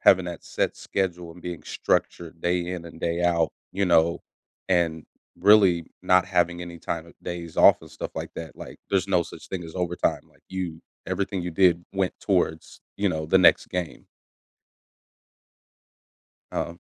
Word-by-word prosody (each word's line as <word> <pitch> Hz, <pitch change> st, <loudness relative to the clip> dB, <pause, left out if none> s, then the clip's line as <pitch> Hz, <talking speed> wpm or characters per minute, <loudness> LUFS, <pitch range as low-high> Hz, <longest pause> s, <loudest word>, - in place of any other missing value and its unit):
Having 95 Hz, -1 st, +5 dB
that 85 Hz, -1 st, -7 dB
set -, -, -1 dB
schedule 90 Hz, -3 st, -2 dB
and 90 Hz, +1 st, -15 dB
being 90 Hz, -2 st, -5 dB
structured 85 Hz, -1 st, -1 dB
day 90 Hz, 0 st, 0 dB
in 90 Hz, -2 st, -4 dB
and 85 Hz, 0 st, -12 dB
day 85 Hz, +1 st, 0 dB
out, 85 Hz, -2 st, +2 dB, 0.2 s
you 100 Hz, +1 st, +1 dB
know, 85 Hz, -1 st, +3 dB, 0.5 s
and 85 Hz, -4 st, +1 dB, 0.3 s
really 95 Hz, -5 st, +5 dB, 0.2 s
not 90 Hz, 0 st, +4 dB
having 90 Hz, -2 st, +1 dB
any 85 Hz, -1 st, -8 dB
time 85 Hz, 0 st, -4 dB
of 85 Hz, -, -15 dB
days 85 Hz, -2 st, -6 dB
off -, -, +7 dB
and -, -, -13 dB
stuff -, -, -6 dB
like -, -, -5 dB
that, 80 Hz, -4 st, -7 dB
like, -, -, -10 dB
there's 95 Hz, -1 st, +1 dB
no 90 Hz, -3 st, +3 dB
such -, -, -11 dB
thing 90 Hz, -2 st, -4 dB
as 80 Hz, -, -10 dB
overtime, 90 Hz, -1 st, 0 dB
like -, -, -28 dB
you 90 Hz, -4 st, -4 dB, 0.3 s
everything 95 Hz, +1 st, -1 dB
you 90 Hz, -, -3 dB
did 85 Hz, -1 st, +3 dB
went 95 Hz, -2 st, 0 dB
towards, 90 Hz, -5 st, -1 dB, 0.2 s
you 100 Hz, 0 st, +1 dB
know, 80 Hz, -3 st, -2 dB
the 95 Hz, +4 st, +5 dB
next 90 Hz, -, +5 dB
game. 90 Hz, -3 st, -4 dB, 2.5 s
Um, 85 Hz, +1 st, -3 dB
85 Hz, 165 wpm, -25 LUFS, 85-95 Hz, 2.5 s, off